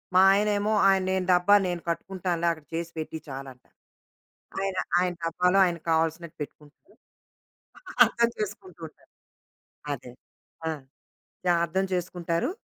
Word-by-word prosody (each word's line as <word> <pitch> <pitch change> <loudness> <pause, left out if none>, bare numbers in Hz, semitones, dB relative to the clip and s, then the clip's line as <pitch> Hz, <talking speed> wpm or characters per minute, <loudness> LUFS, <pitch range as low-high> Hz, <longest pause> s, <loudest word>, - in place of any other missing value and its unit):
మా 185 - +8
ఆయనేమో, 205 +1 +1
ఆయన 195 -1 +4
"నేను 190 -1 0
డబ్బా 180 +3 +5
నేను 175 -1 -3
కట్టుకుంటానులే 175 -1 -2
అక్కడ 155 -2 -7
చేసి 170 +1 -3
పెట్టి 160 0 -4
చాలంటారు." 135 -2 -10 0.8
ఆయన 195 -1 -2 0.2
ఆయన 180 0 +1
డబ్బాలో 180 +3 +2
ఆయనకు 170 -2 -3
కావాల్సినట్టు 160 0 0
పెట్టుకుంటారు. 150 - -11 1.1
అర్థం 235 0 +1
చేసుకుంటూ 195 -4 -6
ఉంటారు. - - -23 0.8
అదే. 125 -2 -6 0.6
ఆ! - - +2 0.8
జా 175 - +4
అర్థం 190 +3 -1
చేసుకుంటారు. 175 - -1
175 Hz, 120 wpm, -27 LUFS, 165-190 Hz, 1.1 s, మా